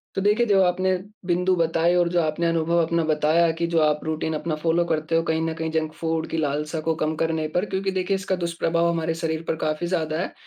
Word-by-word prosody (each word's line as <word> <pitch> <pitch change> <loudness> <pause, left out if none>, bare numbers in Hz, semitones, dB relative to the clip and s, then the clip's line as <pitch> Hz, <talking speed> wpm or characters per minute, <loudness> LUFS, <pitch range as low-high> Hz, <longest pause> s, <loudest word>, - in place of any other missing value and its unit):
तो 195 - 0
देखिए, 210 +4 +3
जो 195 -2 +4
आपने 185 +1 +2 0.3
बिंदु 180 +1 +2
बताएँ 165 +1 +2
और 175 -1 +3
जो 175 - +3
आपने 155 +2 -1
अनुभव 165 +1 +1
अपना 165 0 0
बताया 155 +2 +3
कि 170 - +2
जो 170 -1 0
आप 150 0 +2
रूटीन 160 0 -2
अपना 155 +1 -2
फ़ॉलो 165 +2 +1
करते 160 0 -1
हो, 165 - +3
कहीं 160 -1 0
न - - -1
कहीं 160 0 -3
जंक 160 -1 -1
फूड 160 -1 -1
की - - -2
लालसा 150 +2 -1
को 160 +1 0
कम 155 +1 0
करने 160 -1 0
पर 180 - +2
क्योंकि 195 0 -2
देखिए, 190 +1 -1
इसका 190 -1 -1
दुष्प्रभाव 170 -1 0
हमारे 165 -1 -1
शरीर 160 0 -1
पर 160 - 0
काफ़ी 155 +2 -1
ज़्यादा 160 -3 -1
है। - - -3
165 Hz, 235 wpm, -24 LUFS, 160-175 Hz, 0.3 s, जो